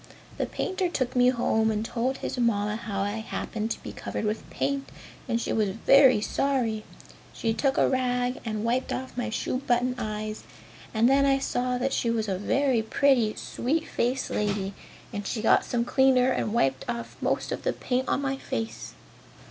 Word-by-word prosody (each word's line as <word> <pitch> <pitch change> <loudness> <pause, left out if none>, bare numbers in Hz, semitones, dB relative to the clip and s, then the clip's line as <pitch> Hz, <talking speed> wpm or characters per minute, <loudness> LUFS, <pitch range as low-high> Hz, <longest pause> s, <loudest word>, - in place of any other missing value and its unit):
The - - 0
painter 375 -1 -1
took 255 -7 -2
me 250 0 +5
home 220 -3 +2
and 215 0 -1
told 250 +3 -1
his - - -4
Mamma 210 -3 +1
how 205 -3 -3
I 205 +2 -1
happened 220 0 -4
to - - -4
be - - -6
covered - - -4
with 215 +1 -3
paint 275 0 -2 0.4
and 235 -2 0
she - - -2
was 215 -3 +2
very 250 +3 +5
sorry. 235 -4 0 0.5
She 225 -1 -1
took 270 +3 +1
a - - +4
rag 250 -1 0
and 215 -2 -3
wiped 245 +3 0
off 260 0 -4
my 245 -1 -2
shoe 225 - -1
button 250 -1 +1
eyes 215 -1 -4 0.5
and 225 +1 +3
then 275 +1 +4
I 270 0 +4
saw 250 -2 -1
that 265 +2 -1
she 235 - +1
was 225 -2 0
a 190 -2 -1
very 260 +3 +2
pretty, 230 -1 +2
sweet 310 +6 -2
faced 250 +3 -1
lady 200 -1 -1 0.4
and 205 -1 -4
she 230 - -2
got 225 - +4
some 235 -1 0
cleaner 260 0 +4
and 215 - -1
wiped 135 - +1
off 235 -1 -4
most - - 0
of - - -3
the - - 0
paint 255 +1 -1
on 280 - +1
my 270 0 -1
face. 115 - -5
235 Hz, 190 wpm, -27 LUFS, 215-260 Hz, 0.5 s, me